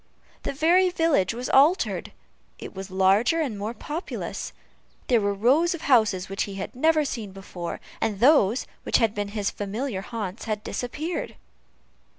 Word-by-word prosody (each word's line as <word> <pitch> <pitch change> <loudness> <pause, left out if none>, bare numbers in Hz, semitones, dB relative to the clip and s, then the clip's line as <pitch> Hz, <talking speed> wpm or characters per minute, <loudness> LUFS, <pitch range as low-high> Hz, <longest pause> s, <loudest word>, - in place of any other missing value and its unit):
The - - -3
very 345 +6 +4
village 325 - +2
was 245 +1 -4
altered: 300 +8 +3 0.5
it - - -9
was 190 0 -7
larger 195 - +3
and 275 -9 -1
more 210 +4 -4
populous. 305 - -5 0.6
There 240 -3 +4
were 200 0 +1
rows 275 - +3
of 330 - -9
houses 215 - +3
which 195 +1 -2
he 200 - -8
had 195 +4 -5
never 310 +3 +3
seen 225 -7 -4
before, 180 -3 -6 0.2
and 205 -3 -1
those 250 -3 +4 0.2
which - - +2
had 225 -3 +2
been 205 -1 -2
his 205 -1 -2
familiar 210 +1 -3
haunts 210 -2 -5
had 215 -2 -3
disappeared. 300 +8 -4
225 Hz, 160 wpm, -25 LUFS, 200-295 Hz, 0.6 s, very